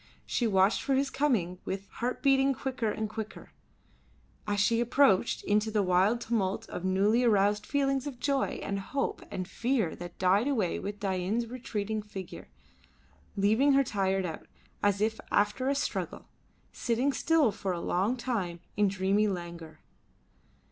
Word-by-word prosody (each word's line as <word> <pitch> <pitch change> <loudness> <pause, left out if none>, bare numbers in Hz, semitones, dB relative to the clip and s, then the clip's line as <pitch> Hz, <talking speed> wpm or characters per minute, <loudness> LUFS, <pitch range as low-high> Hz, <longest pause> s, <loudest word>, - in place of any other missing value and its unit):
She 240 - 0
watched 195 0 +3
for 275 - +1
his 270 0 +1
coming 215 -11 0
with 195 +1 -4
heart 250 +2 -4
beating 270 -1 +4
quicker 255 -4 -2
and 215 +1 -2
quicker, 215 0 -7 1.0
as 205 -1 +2
he 230 0 +2
approached, 240 -4 +3
into 210 +1 +1
a 205 - +3
wild 190 +6 +3
tumult 210 -5 -1
of 180 - -6
newly 200 +6 +3
aroused 210 -2 +2
feelings 275 -1 0
of 260 -4 -7
joy 280 -2 0
and 200 0 -2
hope 275 +8 -3
and 185 -1 -4
fear 235 -8 0
that 175 0 -9
died 195 +6 +3
away 220 -11 0
with 205 +1 -5
Dain's 195 +4 -1
retreating 220 -3 -3
figure, 195 -3 -9 0.9
leaving 220 +8 +3
her 275 0 +5
tired 195 -5 0
out, 165 -3 -6 0.3
as 205 0 +2
if 220 +1 0
after 210 +6 +1
a 280 - +1
struggle, 280 - -3 0.4
sitting 250 +4 0
still 310 -4 +3
for 195 -1 -3
a 175 - -2
long 195 +9 0
time 210 -9 -2 0.2
in 210 0 +3
dreamy 195 +2 +1
languor. 170 -4 -6
210 Hz, 155 wpm, -29 LUFS, 195-250 Hz, 1.0 s, her